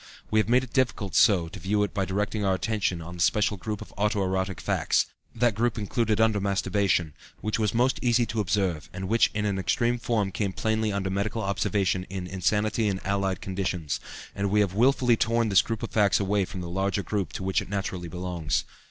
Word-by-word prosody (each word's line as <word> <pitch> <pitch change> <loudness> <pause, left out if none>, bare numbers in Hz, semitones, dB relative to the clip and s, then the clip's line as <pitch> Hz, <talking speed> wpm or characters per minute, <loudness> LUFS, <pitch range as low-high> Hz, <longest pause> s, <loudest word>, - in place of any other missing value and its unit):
We 110 - +4
have 110 0 +1
made 125 +2 +4
it 125 - -10
difficult 120 -7 0
so 95 -7 +4
to 95 - -9
view 105 +4 +1
it 105 - -3
by 95 - 0
directing 105 +3 -1
our 95 -1 +2
attention 95 -4 -1
on 90 +2 -8
the - - -4
special 105 +3 +2
group 105 +3 -5
of - - -17
auto 105 0 +1
erotic 95 -1 -1
facts - - +1 0.3
that 120 -1 +2
group 115 +2 0
included 110 +1 0
under 110 -2 +3
masturbation 100 -4 +1 0.3
which 110 +1 -1
was 110 0 0
most 125 +3 +2
easy 120 -1 +3
to 110 0 -3
observe 90 -6 0
and 95 0 -5
which 115 +3 +4
in 105 0 0
an 100 -2 0
extreme 120 +5 +1
form 110 -5 0
came 100 0 -2
plainly 110 0 0
under 95 -1 -2
medical 105 +3 -1
observation 95 -1 0
in 95 -1 -5
insanity 105 +4 0
and 95 -2 -1
allied 95 -2 0
conditions, 90 -5 -2 0.3
and 100 0 -1
we 105 +1 +3
have 100 -3 0
wilfully 125 +2 +4
torn 115 0 +1
this 100 -2 +6
group 115 0 -4
of 115 - -4
facts 105 -2 +3
away 100 0 +1
from 90 0 -7
the 85 - -5
larger 95 +2 -1
group 95 -8 -2
to - - -5
which 95 0 +1
it - - -9
naturally 95 -3 -3
belongs. 90 -2 -2
100 Hz, 215 wpm, -26 LUFS, 95-110 Hz, 0.3 s, this